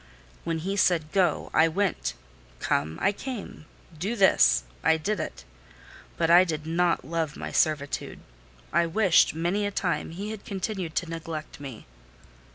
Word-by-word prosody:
When 165 -1 -1
he 195 +5 -3
said 165 -5 +2
"go," 185 -5 +1
I 160 - +5
went; 190 +2 -1 0.4
"come," 80 +2 -1
I 195 - +3
came; 210 - -7 0.3
"do 195 +9 -2
this," 190 - +5 0.2
I 160 - +4
did 200 +5 -2
it. - - -6 0.7
But 165 0 +2
I 175 +2 +8
did 155 -4 -3
not 170 +1 +1
love 160 -2 -2
my - - -5
servitude: 150 -3 0 0.6
I 170 - +3
wished, 180 -2 +4
many 175 +6 0
a 205 - 0
time, 185 -3 -1
he 200 +6 -5
had 220 -2 -7
continued 190 -4 -4
to 180 - 0
neglect 160 -2 -6
me. 135 -6 -9
170 Hz, 155 wpm, -27 LUFS, 160-195 Hz, 0.7 s, I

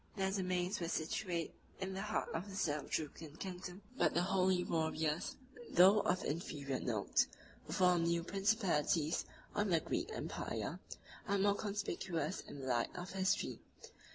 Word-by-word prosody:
Their 190 -2 +1
domains 185 0 0
were 170 - -2
situate 170 +1 -1 0.3
in 190 0 -3
the 190 - -3
heart 215 +1 -1
of 175 +5 -3
the 195 - -7
Seljukian 150 -1 -2
kingdom; 185 0 -6
but - - +2
the 175 - +4
holy 185 -1 +3
warriors, 160 -1 0 0.3
though 190 +4 +7
of 185 - +1
inferior 140 -4 -2
note, 110 -5 +1 0.4
who 155 - -4
formed 180 -3 +4
new 170 0 +2
principalities 180 -6 +2 0.3
on 205 0 +1
the 170 -2 +4
Greek - - -2
empire, - - -3 0.5
are 200 - +2
more 200 +1 +4
conspicuous 195 -6 -2
in 140 - -9
the 130 - -5
light 120 -2 +2
of 180 +1 -5
history. 190 0 +1
180 Hz, 150 wpm, -37 LUFS, 160-195 Hz, 0.5 s, though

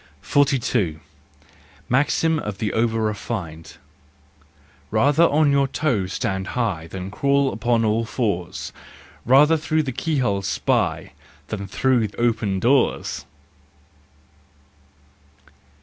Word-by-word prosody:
42. 125 - +1 0.9
Maxim 150 +5 +2
of 105 -7 -5
the 105 +1 -2
Over 115 0 +1
refined, 95 -6 -5 0.6
" - - -32
Rather 145 +4 +4
on 150 -2 +3
your 140 -1 +3
toes 125 -8 -1
stand 95 0 -2
high 95 -10 -1
Than 95 +2 -7
crawl 140 +3 +1
upon 115 +2 +1
all 110 +2 +1
fours, 100 -7 -3 0.5
Rather 150 +6 +6
through 155 0 0
the 135 - -3
keyhole 125 -8 -1
spy 100 - -1 0.4
Than 100 -2 -4
through 120 +2 +1
open 110 -5 0
doors! 125 +4 +1
115 Hz, 100 wpm, -22 LUFS, 100-140 Hz, 0.9 s, Rather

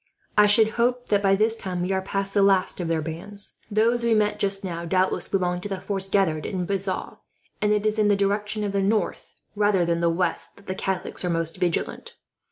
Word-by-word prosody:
"I 210 0 +6
should 220 +1 +4
hope 245 +1 0
that, 205 -1 +3
by 195 -1 +4
this 220 +3 +2
time, 185 -5 -4
we 185 - -2
are 190 0 +1
past 195 +1 -3
the 205 - +3
last 195 -2 +3
of 175 - -3
their 165 -1 0
bands. 175 +6 -6
Those 230 +3 +2
we 230 -1 +3
met 210 -1 +1
just 195 0 0
now 170 -3 -4
doubtless 185 +2 +1
belonged 180 -2 -1
to 205 - -6
the 195 -1 -3
force 195 0 -3
gathered 170 -6 +1
in 185 -3 -3
Bazas; 195 0 -3 0.4
and 210 0 +2
it 210 0 +1
is 215 0 +1
in 210 - +4
the 205 - +4
direction 205 +2 -1
of 205 - -1
the 200 0 0
north, 200 -1 -1 0.2
rather 205 -4 +2
than 170 0 0
the 170 0 +2
west, 175 +2 -2
that 200 - -18
the 185 - -3
Catholics 190 0 -2
are 180 - 0
most 165 0 -1
vigilant. 180 -3 -2
195 Hz, 225 wpm, -24 LUFS, 180-210 Hz, 0.4 s, I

